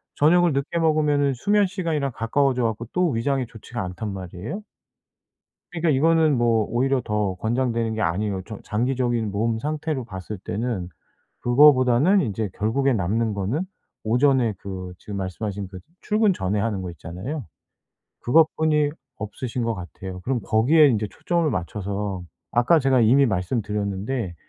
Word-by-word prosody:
저녁을 170 +1 +4
늦게 140 +5 -1
먹으면은 150 -3 +2
수면 205 - +2
시간이랑 165 -8 -2
가까워져 125 +2 +1
갖고 115 +1 -1
또 180 -2 +2
위장이 130 +2 0
좋지가 115 0 -7
않단 95 +3 -5
말이에요? 95 - -6 1.1
그러니까 165 -1 0
이거는 155 0 +3
뭐 115 -2 +2
오히려 130 +2 +1
더 105 -3 -1
권장되는 115 0 0
게 110 - -2
아니에요. 95 +3 -1
저 110 - -8
장기적인 120 -1 0
몸 110 +2 0
상태로 150 -1 -2
봤을 95 -1 -7
때는 105 -3 -3 0.5
그거보다는 130 +6 +5
인제 105 -2 -2
결국에 130 +6 +1
남는 110 +2 0
거는 105 - -1 0.4
오전에 125 -1 +3
그 95 -2 -7
지금 100 -1 -7
말씀하신 100 +1 -4
그 95 -1 -9 0.2
출근 210 -1 +2
전에 100 - -1
하는 105 -4 -1
거 90 - -5
있잖아요. 90 - -6 0.8
그것뿐이 155 +1 +3 0.3
없으신 115 +4 -4
것 115 0 0
같아요. 90 0 -8
그럼 125 +4 -1
거기에 140 +10 +5
인제 110 -5 +1
초점을 170 +6 -1
맞춰서 100 0 -3 0.3
아까 125 +8 +4
제가 135 -2 +3
이미 130 +5 +5
말씀드렸는데 100 0 -2
115 Hz, 345 characters per minute, -23 LUFS, 100-140 Hz, 1.1 s, 그거보다는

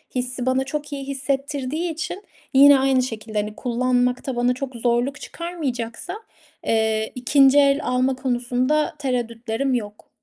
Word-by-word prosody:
hissi 250 0 -2
bana 260 +1 +2
çok 295 +1 -5
iyi 275 -1 -5
hissettirdiği 280 +3 -2
için 355 +5 -5 0.3
yine 280 +1 +8
aynı 265 -1 +3
şekilde, 220 -3 -5
hani, 210 0 -4
kullanmakta 250 +1 0
bana 245 +1 +2
çok 260 0 -6
zorluk 240 +4 0
çıkarmayacaksa, 310 - -5 0.5
eee, 220 -1 +1
2'nci 270 +3 +5
el 280 0 +4
alma 255 +1 +1
konusunda 255 +3 0
tereddütlerim 245 0 -2
yok. 210 -4 -4
255 Hz, 130 wpm, -22 LUFS, 240-275 Hz, 0.5 s, yine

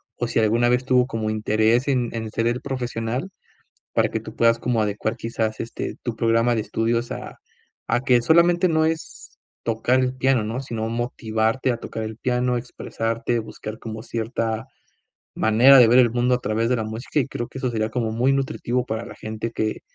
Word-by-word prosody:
o 120 - -2
si 115 - 0
alguna 115 +2 +3
vez 125 +1 +1
tuvo 125 -1 +4
como 110 -4 -3
interés 110 +4 +2
en 125 -4 +1
en 110 -1 -4
ser 115 0 0
él 120 +1 0
profesional, 125 +2 -3 0.6
para - - +3
que - - -3
tú - - -10
puedas 115 0 +4
como 115 -2 0
adecuar 105 +1 -2
quizás, 110 -1 -2
este, 115 - -5
tu 120 -3 -4
programa 115 +1 +2
de 110 - 0
estudios 115 +3 -1
a - - -6 0.5
a 120 +1 +1
que 125 -3 +3
solamente 170 +5 +4
no 160 -1 +2
es 160 0 -5 0.3
tocar 120 +3 +1
el 130 0 0
piano, 130 -3 +2
¿no?, 115 +5 -3
sino 110 -3 -4
motivarte 115 +1 -1
a - - -4
tocar 110 -1 -6
el 110 0 -6
piano, 125 0 0
expresarte, 115 -1 -3
buscar 110 0 -8
como 110 -1 -6
cierta 115 -1 -3 0.7
manera 120 +5 +6
de 120 - +8
ver 120 +2 +6
el 120 -3 +6
mundo 125 +1 +2
a - - +1
través 115 +2 0
de 125 - +3
la 110 - -2
música. 115 +7 -2
Y - - -1
creo 120 -3 -4
que 130 - -9
eso 130 -1 -1
sería 110 -1 -1
como 115 -1 -1
muy 125 +4 +2
nutritivo 125 -2 -1
para 110 +1 -3
la - - -10
gente 110 +1 -5
que 110 -1 -2
115 Hz, 200 wpm, -23 LUFS, 110-125 Hz, 0.7 s, de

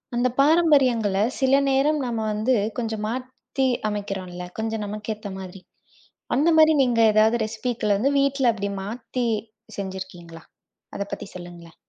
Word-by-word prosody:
அந்தப் 245 +1 0
பாரம்பரியங்களை 265 - +3 0.2
சில 265 0 +2 0.2
நேரம் 285 +3 +2
நாம 230 -3 -2
வந்து 220 +5 +1 0.2
கொஞ்சம் 220 -2 -3
மாத்தி 255 +2 -3 0.2
அமைக்கிறோம்ல, 190 -3 -5 0.2
கொஞ்சம் 220 -1 -2
நமக்கு 210 +1 -4
ஏத்த 210 -1 -8
மாதிரி. 185 0 -9 0.7
அந்த 300 +5 +3
மாதிரி. 315 0 +7
நீங்க 245 -3 +1
ஏதாவது 220 +2 +4
ரெசிபிகள 220 -1 -1
வந்து 275 +6 +2
வீட்டுல 275 -3 +2
அப்படி 200 -2 -3
மாத்தி 235 +4 -4 0.5
செஞ்சிருக்கீங்களா? 185 -4 -7 0.5
அதைப் 200 0 -4
பத்தி - - -5
சொல்லுங்களேன். 175 -2 -11
220 Hz, 130 wpm, -24 LUFS, 200-255 Hz, 0.7 s, மாதிரி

